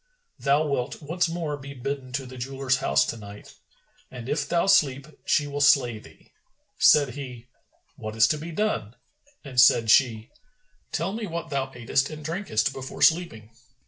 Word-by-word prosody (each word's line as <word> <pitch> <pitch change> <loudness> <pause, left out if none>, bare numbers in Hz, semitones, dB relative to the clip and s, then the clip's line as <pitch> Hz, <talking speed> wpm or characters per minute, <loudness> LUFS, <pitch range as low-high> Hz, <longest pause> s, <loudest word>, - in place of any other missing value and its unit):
Thou 145 +3 +2
wilt 140 -3 -2
once 170 +3 0
more 165 -3 -3
be 140 0 -10
bidden 135 0 -5
to 135 +1 -3
the 130 0 -11
jeweller's 135 +1 -1
house 70 - +2
to 115 - -4
night,[FN#416] 105 -1 -12 0.6
and 120 +1 -8
if 150 0 -1
thou 170 0 +2
sleep, 145 -9 +3 0.2
she 145 - +2
will 145 0 -4
slay 125 -6 +4
thee." - - -19 0.5
Said 145 -3 +6
he, 125 -2 -9 0.5
"What 110 0 -6
is 110 +1 +5
to 150 - 0
be 165 +3 -7
done?"; 160 - -2 0.5
and 125 -3 +2
said 115 -3 +5
she, 115 -4 +3 0.6
"Tell 175 +5 -2
me 220 -1 -4
what 170 -1 -6
thou 135 -1 -1
atest 135 +1 -1
and 155 -1 -9
drankest 165 - -1
before 135 -1 -5
sleeping." 160 -11 +2
135 Hz, 170 wpm, -25 LUFS, 125-155 Hz, 0.6 s, Said